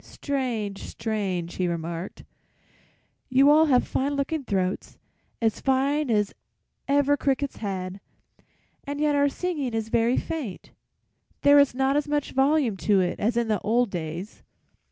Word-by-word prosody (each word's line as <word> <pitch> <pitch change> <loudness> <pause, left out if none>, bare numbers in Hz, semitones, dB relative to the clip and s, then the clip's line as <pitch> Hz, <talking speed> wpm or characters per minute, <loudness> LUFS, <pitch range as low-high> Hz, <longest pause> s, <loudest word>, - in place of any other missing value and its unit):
"'Strange, 240 -8 -3
strange!' 190 -6 -3
he 185 - 0
remarked. 170 +1 -5 1.1
'You 270 +2 +5
all 315 +1 +5
have 255 -4 +3
fine 280 +2 -1
looking 280 +2 -2
throats, 190 -5 -2 0.4
as 225 -2 0
fine 275 +2 +1
as 210 -3 +1 0.5
ever 285 +1 +3
crickets 280 0 -1
had, 190 -2 -4 0.8
and 285 +1 -5
yet 300 -1 +2
our 285 0 +3
singing 290 -7 -3
is 225 0 -2
very 235 +2 +2
faint; 295 - -5 0.7
there 285 0 +7
is 280 -3 +3
not 265 +1 +1
as 295 0 0
much 290 -1 -1
volume 270 -5 +2
to 200 0 +2
it 180 -1 -1
as 230 +3 0
in 235 -1 +1
the 215 -3 +1
old 230 +1 +1
days. 170 +3 -6
245 Hz, 145 wpm, -25 LUFS, 200-285 Hz, 1.1 s, there